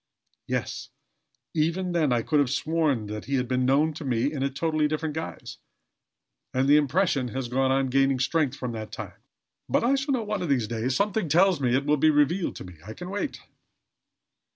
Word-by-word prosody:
Yes, - - -3 0.6
even 170 +4 0
then 160 -5 +1
I 120 -2 +1
could 150 -2 +2
have 140 -3 +2
sworn 145 -4 0
that 105 +1 -6
he 140 - -1
had 125 -2 0
been 130 0 0
known 150 +4 +3
to 155 - -8
me 130 +2 0
in 140 - -4
a 140 - +1
totally 155 +2 0
different 155 0 -2
guise, 160 +1 -6 1.0
and 130 +1 +2
the 145 +1 +7
impression 150 -2 +1
has 125 +1 -4
gone 130 +1 +1
on 135 -1 +1
gaining 135 0 +3
strength 145 +1 0
from 125 -2 -4
that 110 -2 -6
time. - - -8 0.5
But - - +2
I 245 +3 +3
shall 275 +1 0
know 235 - -2
one 210 -2 -3
of 175 - -3
these 125 -6 +1
days. 120 +3 -2
Something 200 -2 0
tells 180 0 +4
me 125 -2 +2
it 140 +1 0
will 150 +1 +3
be 155 +3 +4
revealed 155 +5 +2
to - - -8
me. 90 -2 -12
I 110 +3 -9
can 180 +1 -7
wait." 205 +8 -3
145 Hz, 205 wpm, -26 LUFS, 130-165 Hz, 1.0 s, the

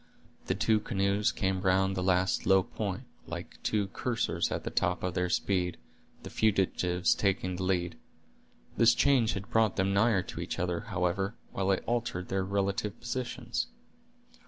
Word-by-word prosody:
The - - +1
two 110 -1 +2
canoes 100 -1 +1
came 95 -1 -1
round 95 0 +2
the 90 - -1
last 90 0 +1
low 95 -1 +5
point, - - -4 0.2
like - - -7
two 105 -2 +1
coursers 115 +3 -1
at - - -2
the - - -4
top 90 - 0
of 90 -1 -1
their 90 0 0
speed, 90 -1 0 0.5
the - - -8
fugitives 95 -4 +2
taking 95 -2 0
the - - -5
lead. 90 -2 -1 0.8
This 115 0 +6
change 130 -5 +3
had 100 -1 -6
brought 110 -3 +3
them 95 +1 +1
nigher 100 -2 +3
to - - -8
each - - -4
other, 90 -1 -1
however, 95 +4 -1 0.2
while 95 0 -1
it 95 - +1
altered 115 -7 -2
their 95 0 0
relative 100 0 -1
positions. 120 +1 -3
95 Hz, 160 wpm, -30 LUFS, 90-105 Hz, 0.8 s, This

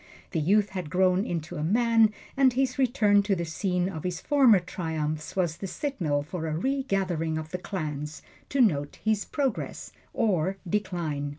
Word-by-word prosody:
The 165 - 0
youth 200 +6 +3
had 180 -5 -5
grown 185 +2 +3
into 170 0 -4
a 150 - -2
man, 225 +4 +4 0.2
and 270 -2 +4
his 260 0 0
return 220 -6 +4
to 200 -1 +1
the 170 -1 -2
scene 180 +2 -1
of 160 -5 -5
his 180 -1 -2
former 265 -6 +5
triumphs 155 -3 -4
was 175 -4 0
the 195 - -5
signal 175 - -1
for 160 +1 -5
a 155 0 -2
regathering 190 - -1
of 160 0 -5
the 180 - -3
clans 150 -5 -5 0.3
to 275 - +2
note 145 - +2
his 215 -2 +1
progress 270 -6 -3 0.2
or 190 -3 +1
decline. 170 -7 -2
185 Hz, 170 wpm, -27 LUFS, 160-215 Hz, 0.3 s, former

